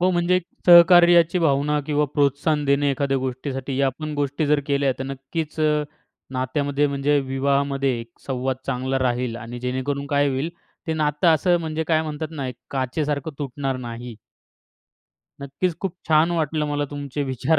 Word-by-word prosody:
हो, 185 Hz, +1 st, +3 dB
म्हणजे 175 Hz, +1 st, +2 dB
एक 185 Hz, -, -1 dB, 0.2 s
सहकार्याची 175 Hz, 0 st, +7 dB
भावना 150 Hz, -2 st, +2 dB
किंवा 150 Hz, -1 st, +1 dB
प्रोत्साहन 145 Hz, +1 st, +1 dB
देणे 140 Hz, 0 st, +2 dB
एखाद्या 135 Hz, 0 st, 0 dB
गोष्टीसाठी, 130 Hz, +1 st, -4 dB
या 140 Hz, -, +3 dB
आपण 150 Hz, +3 st, -4 dB
गोष्टी 145 Hz, +1 st, -1 dB
जर 150 Hz, 0 st, +3 dB
केल्या 140 Hz, -2 st, +1 dB
तर 130 Hz, -, -3 dB
नक्कीच 135 Hz, +4 st, -5 dB
अ, 150 Hz, -1 st, +2 dB, 0.5 s
नात्यामध्ये, 140 Hz, +3 st, 0 dB
म्हणजे 140 Hz, +1 st, +1 dB
विवाहामध्ये 135 Hz, -1 st, 0 dB, 0.2 s
संवाद 130 Hz, -1 st, -1 dB
चांगला 130 Hz, +1 st, -1 dB
राहील 125 Hz, -2 st, -1 dB
आणि 120 Hz, +1 st, -7 dB
जेणेकरून 130 Hz, +3 st, -2 dB
काय 145 Hz, -1 st, +2 dB
होईल, 135 Hz, +5 st, -2 dB, 0.4 s
ते 160 Hz, -, -1 dB
नातं 150 Hz, +2 st, +1 dB
असं, 175 Hz, +3 st, +2 dB
म्हणजे 160 Hz, 0 st, -3 dB
काय 160 Hz, -1 st, +3 dB
म्हणतात 155 Hz, 0 st, -4 dB
ना? 140 Hz, -5 st, -4 dB
एक 125 Hz, -, -6 dB, 0.2 s
काचेसारखं 140 Hz, +3 st, -2 dB
तुटणार 135 Hz, -1 st, -3 dB
नाही. 120 Hz, -1 st, -7 dB, 1.3 s
नक्कीच 140 Hz, +6 st, -2 dB
खूप 190 Hz, -3 st, -2 dB
छान 160 Hz, +2 st, +4 dB
वाटलं 155 Hz, -2 st, 0 dB
मला 145 Hz, 0 st, 0 dB
तुमचे 145 Hz, 0 st, -4 dB
विचार 135 Hz, +4 st, +1 dB
145 Hz, 155 wpm, -23 LUFS, 135-155 Hz, 1.3 s, सहकार्याची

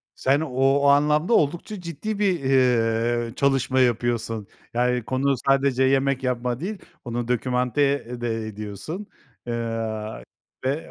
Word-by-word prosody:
Sen 135 Hz, +2 st, +2 dB
o 135 Hz, -1 st, +2 dB
anlamda 150 Hz, +6 st, +3 dB
oldukça 175 Hz, +7 st, 0 dB
ciddi 175 Hz, +5 st, -4 dB
bir, 190 Hz, -5 st, +1 dB
eee, 120 Hz, -3 st, +2 dB
çalışma 135 Hz, -1 st, +2 dB
yapıyorsun. 115 Hz, -3 st, 0 dB, 0.3 s
Yani, 125 Hz, 0 st, +1 dB
konu 135 Hz, +4 st, +1 dB
sadece 135 Hz, -1 st, +3 dB
yemek 135 Hz, 0 st, +2 dB
yapma 125 Hz, -1 st, -1 dB
değil, 200 Hz, +5 st, -4 dB, 0.3 s
onu 120 Hz, 0 st, -4 dB
documenté 125 Hz, +1 st, 0 dB
de 115 Hz, -2 st, -2 dB
ediyorsun, 110 Hz, -, -6 dB, 0.4 s
eee, 115 Hz, -2 st, -3 dB, 0.4 s
ve 140 Hz, +5 st, -2 dB
130 Hz, 115 wpm, -24 LUFS, 120-140 Hz, 0.4 s, anlamda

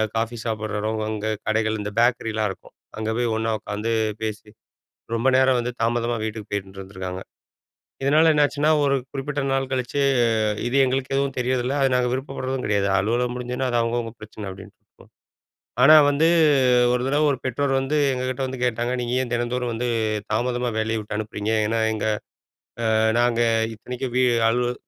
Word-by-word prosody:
Coffee 115 Hz, +1 st, -2 dB
சாப்பிடுறதும், 110 Hz, -1 st, -2 dB
அங்க 110 Hz, 0 st, -3 dB, 0.2 s
கடைகள் 110 Hz, 0 st, 0 dB
இந்த 105 Hz, 0 st, -4 dB
பேக்கரிலாம் 115 Hz, -3 st, +1 dB
இருக்கும். 95 Hz, -, -14 dB, 0.2 s
அங்க 110 Hz, 0 st, -3 dB
போய் 120 Hz, -2 st, 0 dB
ஒண்ணா 110 Hz, 0 st, -1 dB
உக்காந்து 105 Hz, +2 st, -4 dB, 0.3 s
பேசி. 110 Hz, -1 st, -5 dB, 0.7 s
ரொம்ப 115 Hz, +3 st, +1 dB
நேரம் 130 Hz, -1 st, +4 dB
வந்து 120 Hz, +1 st, -3 dB
தாமதமா 120 Hz, 0 st, 0 dB
வீட்டுக்கு 110 Hz, -1 st, -5 dB
போயிட்டுருந்துருக்காங்க. 95 Hz, -2 st, -6 dB, 0.8 s
இதனால 155 Hz, +4 st, +5 dB
என்னாச்சுன்னா 150 Hz, 0 st, +2 dB
ஒரு 140 Hz, -1 st, +2 dB, 0.2 s
குறிப்பிட்ட 145 Hz, +1 st, -3 dB
நாள் 135 Hz, 0 st, 0 dB
கழிச்சு, 130 Hz, +1 st, -2 dB, 0.7 s
இது 120 Hz, -, -2 dB
எங்களுக்கு 130 Hz, +1 st, -1 dB
எதுவும் 140 Hz, -1 st, -1 dB
தெரியர்தில்ல. 125 Hz, +1 st, 0 dB
அது 135 Hz, -1 st, +2 dB
நாங்க 125 Hz, -1 st, +2 dB
விருப்பப்படுறதும் 130 Hz, 0 st, -3 dB
கெடயாது, 100 Hz, -1 st, +1 dB
அலுவலகம் 120 Hz, +5 st, 0 dB
முடிஞ்சுனா 125 Hz, +1 st, -3 dB
அது 120 Hz, -, +1 dB
அவங்கவங்க 115 Hz, 0 st, -1 dB
பிரச்சன 105 Hz, -1 st, -8 dB
அப்டின்ட்டு, 95 Hz, +1 st, -12 dB, 1.0 s
ஆனா 150 Hz, +4 st, +9 dB
வந்து 145 Hz, +3 st, +3 dB, 0.7 s
ஒரு 125 Hz, 0 st, 0 dB
தடவ 145 Hz, +3 st, +2 dB
ஒரு 135 Hz, -, -4 dB
பெற்றோர் 135 Hz, +2 st, -1 dB
வந்து, 135 Hz, +3 st, -1 dB, 0.2 s
எங்ககிட்ட 130 Hz, 0 st, -3 dB
வந்து 130 Hz, 0 st, -6 dB
கேட்டாங்க. 120 Hz, 0 st, 0 dB
நீங்க 120 Hz, 0 st, -3 dB
ஏன் 120 Hz, -2 st, -5 dB
தினந்தோறும் 120 Hz, +1 st, -1 dB
வந்து 120 Hz, +2 st, -2 dB, 0.4 s
தாமதமா 120 Hz, +2 st, 0 dB
வேலய 110 Hz, +1 st, 0 dB
விட்டு 105 Hz, 0 st, -5 dB
அனுப்புறீங்க? 110 Hz, 0 st, -3 dB
ஏன்னா 115 Hz, +1 st, 0 dB
எங்க 110 Hz, -1 st, -2 dB, 0.9 s
ஆ -, -, +3 dB, 0.2 s
நாங்க 120 Hz, -1 st, +2 dB, 0.3 s
இத்தனைக்கும் 125 Hz, +3 st, -6 dB
வீ 130 Hz, -, +3 dB, 0.3 s
அலுவல 120 Hz, +1 st, 0 dB
120 Hz, 150 wpm, -23 LUFS, 110-130 Hz, 1.0 s, ஆனா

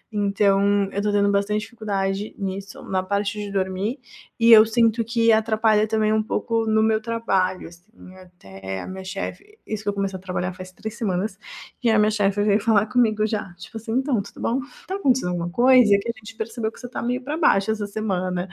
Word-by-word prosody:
então 200 Hz, 0 st, +2 dB
eu -, -, -7 dB
estou 210 Hz, 0 st, 0 dB
tendo 200 Hz, 0 st, +2 dB
bastante 205 Hz, +1 st, 0 dB
dificuldade 205 Hz, -3 st, -3 dB
nisso, 195 Hz, 0 st, -6 dB
na 190 Hz, -1 st, -1 dB
parte 200 Hz, +2 st, -2 dB
de 205 Hz, -1 st, -5 dB
dormir, 195 Hz, +6 st, -2 dB, 0.4 s
e 230 Hz, 0 st, +5 dB
eu 215 Hz, -1 st, +10 dB
sinto 230 Hz, 0 st, +2 dB
que 230 Hz, 0 st, +2 dB
atrapalha 220 Hz, -1 st, +3 dB
também 215 Hz, 0 st, +1 dB
um 220 Hz, -, +2 dB
pouco 225 Hz, 0 st, -1 dB
no 220 Hz, 0 st, +3 dB
meu 220 Hz, 0 st, +2 dB
trabalho, 195 Hz, -7 st, -1 dB
assim, 185 Hz, +2 st, -17 dB
até 95 Hz, -, -9 dB
a -, -, -8 dB
minha 190 Hz, 0 st, -7 dB
chefe 390 Hz, -, -7 dB
isso 215 Hz, -1 st, -4 dB
que 205 Hz, -, -1 dB
eu -, -, -1 dB
comecei 195 Hz, -1 st, -2 dB
a -, -, -15 dB
trabalhar 180 Hz, 0 st, -3 dB
faz 185 Hz, 0 st, -10 dB
3 220 Hz, +4 st, -7 dB
semanas, 195 Hz, -3 st, -2 dB, 0.5 s
e 235 Hz, -, +3 dB
a 220 Hz, -, +4 dB
minha 210 Hz, +1 st, +3 dB
chefe 205 Hz, -1 st, +1 dB
veio 205 Hz, 0 st, +3 dB
falar 215 Hz, -2 st, +3 dB
comigo 220 Hz, -3 st, +2 dB
já. 210 Hz, -4 st, -3 dB
Tipo 185 Hz, +6 st, -10 dB
assim: 225 Hz, +1 st, -5 dB
"Então, 260 Hz, -4 st, +1 dB
tudo -, -, -13 dB
bom? 245 Hz, +4 st, 0 dB, 0.3 s
Tá 380 Hz, -, -3 dB
acontecendo 260 Hz, -, +1 dB
alguma 175 Hz, -1 st, -2 dB
coisa? 250 Hz, +2 st, +5 dB
Porque 200 Hz, +4 st, -2 dB
a -, -, -15 dB
gente 220 Hz, +1 st, -12 dB
percebeu 220 Hz, 0 st, -3 dB
que -, -, -17 dB
você 245 Hz, -, -9 dB
está 250 Hz, -, -6 dB
meio 250 Hz, +2 st, -1 dB
pra 295 Hz, +3 st, -3 dB
baixo 210 Hz, -, +3 dB
essa 210 Hz, -2 st, -3 dB
semana". 185 Hz, -3 st, -2 dB
210 Hz, 210 wpm, -23 LUFS, 195-225 Hz, 0.5 s, eu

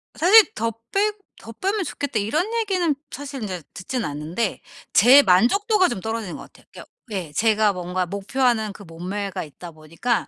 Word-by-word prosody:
사실 430 Hz, +5 st, +6 dB
더 230 Hz, 0 st, -1 dB, 0.2 s
빼 415 Hz, +2 st, +2 dB, 0.3 s
"더 225 Hz, -, -10 dB
빼면 390 Hz, -, -1 dB
좋겠다." 285 Hz, -8 st, -3 dB
이런 245 Hz, -, 0 dB
얘기는 370 Hz, -9 st, +1 dB, 0.2 s
사실 280 Hz, -2 st, -7 dB
인제 185 Hz, -6 st, -5 dB
듣진 240 Hz, +5 st, -4 dB
않는데 155 Hz, +9 st, -3 dB, 0.3 s
제 260 Hz, +7 st, +8 dB
만족도가 375 Hz, -, +3 dB
좀 240 Hz, -6 st, -3 dB
떨어지는 220 Hz, -4 st, -4 dB
것 -, -, -10 dB
같아요. -, -, -19 dB
게오 -, -, -11 dB, 0.3 s
예 180 Hz, -7 st, -4 dB
제가 215 Hz, +3 st, +3 dB
뭔가 180 Hz, 0 st, -2 dB
목표하는 220 Hz, +3 st, 0 dB
그 205 Hz, -, -12 dB
몸매가 185 Hz, +3 st, -5 dB
있다 170 Hz, +3 st, -11 dB
보니까 165 Hz, +10 st, -2 dB
220 Hz, 340 characters per minute, -22 LUFS, 180-285 Hz, 0.3 s, 제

